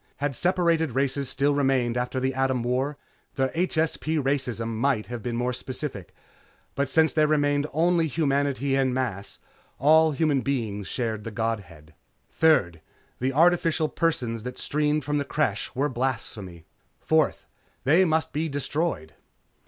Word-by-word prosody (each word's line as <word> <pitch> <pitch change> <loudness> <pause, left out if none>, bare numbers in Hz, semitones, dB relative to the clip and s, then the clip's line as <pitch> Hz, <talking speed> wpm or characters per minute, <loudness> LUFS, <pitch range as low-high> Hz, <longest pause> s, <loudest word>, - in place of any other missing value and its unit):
Had 145 -1 -2
separate 170 0 +2
races 135 +2 -1
still 145 +1 +1
remained 135 -4 +1
after 125 +1 -1
the 130 +1 0
Atom 130 -2 0
War, 130 +4 -1 0.4
the 135 0 +1
HSP 160 -2 0
racism 130 -5 -1
might 115 0 0
have 120 -1 -6
been 120 +2 -3
more 125 +1 -1
specific, 130 - -6 0.6
but 140 0 -1
since 160 +3 +3
there 155 -1 +3
remained 145 -1 +1
only 165 +2 +2
humanity 140 -2 0
en 130 -2 +1
masse, 115 -7 -3 0.4
all 160 +3 +5
human 145 -2 +1
beings 110 -8 -2
shared 110 -4 -3
the 115 - -5
godhead. 100 -9 -4 0.4
Third, 100 - +2 0.4
the 130 +2 0
artificial 165 +1 +3
persons 125 -9 -1
that 125 +2 -7
streamed 150 0 0
from 145 +1 0
the - - 0
Creche 140 -8 -1
were 140 +3 +1
blasphemy. 115 - -4 0.3
Fourth, 160 -2 +1 0.4
they 160 +8 +5
must 160 -2 0
be 155 +2 -1
destroyed. 145 - -2
135 Hz, 145 wpm, -25 LUFS, 120-155 Hz, 0.6 s, all